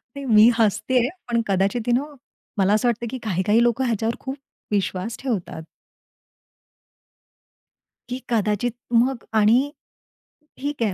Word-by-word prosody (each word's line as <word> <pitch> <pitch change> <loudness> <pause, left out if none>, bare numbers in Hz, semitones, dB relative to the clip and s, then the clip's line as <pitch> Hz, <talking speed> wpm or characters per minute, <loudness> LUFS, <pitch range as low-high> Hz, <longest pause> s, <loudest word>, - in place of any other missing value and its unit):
नाही, 280 0 -6
मी 220 -2 +7
हसते 225 +3 +1
आहे. 245 +1 +1 0.2
पण 235 -1 +2
कदाचित 195 +4 0
यू 240 - +3
नो 270 +4 0 0.5
मला 195 0 +3
असं 215 +3 +2
वाटतं 235 0 0
की, 260 - -5
काही, 190 -4 -1
काही 215 +4 +4
लोकं 240 +2 +1
ह्याच्यावर 230 -1 -1
खूप 270 +1 -6 0.3
विश्वास 200 +1 -1
ठेवतात. 210 -10 -3 2.5
की 250 +1 -3
कदाचित, 215 0 0 0.2
मग 240 +1 +2
आणि 235 +7 +4 0.9
ठीक 285 -2 -3
आहे 210 -4 0
230 Hz, 135 wpm, -23 LUFS, 210-245 Hz, 2.5 s, मी